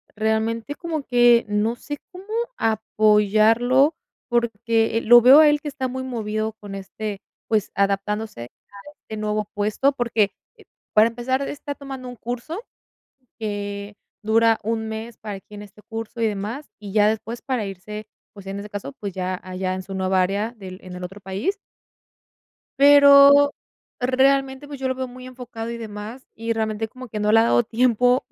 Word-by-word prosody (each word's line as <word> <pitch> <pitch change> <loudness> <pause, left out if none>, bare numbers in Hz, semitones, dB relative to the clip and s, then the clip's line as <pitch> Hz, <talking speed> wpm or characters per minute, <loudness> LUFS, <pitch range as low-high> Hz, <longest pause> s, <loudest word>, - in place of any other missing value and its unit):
realmente 220 +4 -1
como 320 -4 -4
que, 240 -2 +4
no 210 +3 0
sé 290 +4 -7
cómo 370 +1 -11 0.3
apoyarlo, 220 +5 +3 0.3
porque, 230 -1 +1
eh, - - 0
lo 240 +1 +8
veo 265 +5 +9
a 305 -1 +7
él 295 0 +2
que 300 - -7
está 270 -2 -3
muy 260 +1 -4
movido 220 -3 -3
con 200 -1 -8
este, 200 +1 -6 0.3
pues, 215 -3 0
adaptándose 200 - -1 0.4
a - - -9
este 220 -7 -10
nuevo 210 0 -2
puesto, 210 +7 +1
porque, 235 -5 +1 0.6
para 215 +2 +6
empezar 255 +3 -2
está 285 0 -6
tomando 270 -3 -8
un 245 - -7
curso 245 - -5 0.8
que 205 -1 -5 0.3
dura 225 +1 +3
un 220 0 -2
mes, 220 +1 -6
para 210 -2 -6
aquí 210 +2 -14
en 205 - -8
este 205 +1 -16
curso, 225 +1 -6
y 225 - +3
demás, 215 +8 -4
y 205 -2 -8
ya 210 -1 +5
después 225 +2 -4
para 250 -6 -2
irse, 210 +2 -7 0.3
pues, 200 -2 -13
en 195 +1 -4
ese 205 +1 -8
caso, 205 +7 -6
pues, 200 -4 -5
ya 185 0 -3
allá 185 0 -3
en 185 - -5
su 195 +1 -8
nueva 190 0 +1
área 205 +5 -1
del 185 -2 -9
en 180 -1 -9
el 180 - -7
otro 195 +3 -8
país. 200 - -2 1.2
Pero 285 0 +8 0.5
realmente, 265 +2 +2
pues, 285 -2 -9
yo 260 - -1
lo 260 - 0
veo 260 - -3
muy 255 0 -11
enfocado 240 -3 -7
y 235 - -5
demás. 220 +3 -8
Y, 230 +1 -2
realmente, 220 0 -2
como 255 +1 -11
que 210 -1 -5
no 210 0 +1
le 225 - +7
ha - - +4
dado 240 - +3
tiempo, 245 +2 +2
225 Hz, 175 wpm, -22 LUFS, 210-255 Hz, 1.2 s, veo